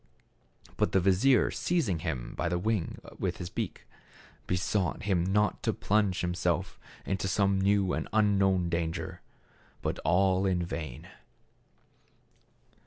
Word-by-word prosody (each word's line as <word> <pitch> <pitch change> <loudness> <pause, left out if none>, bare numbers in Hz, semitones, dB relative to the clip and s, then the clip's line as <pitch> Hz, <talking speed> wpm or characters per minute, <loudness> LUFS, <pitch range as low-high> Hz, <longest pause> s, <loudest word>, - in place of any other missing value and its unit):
But - - +1
the 95 - +5
vizier 100 +8 +4
seizing 130 - 0
him 75 -7 -4
by 85 - -1
the 90 - 0
wing 105 -1 -1 0.2
with - - -1
his 90 0 -6
beak, - - -4 0.6
besought 90 0 0
him 95 -4 +1
not 105 +3 +1
to - - 0
plunge 100 -4 +1
him 90 0 0
self 90 0 -1 0.3
into 95 0 -1
some 95 0 +2
new 100 -1 +2
and - - -2
unknown 100 -4 +3
danger. 85 0 -3 0.6
But - - -2
all 95 +4 +2
in 90 -2 +1
vain. 80 -2 -6
95 Hz, 130 wpm, -29 LUFS, 85-100 Hz, 0.6 s, the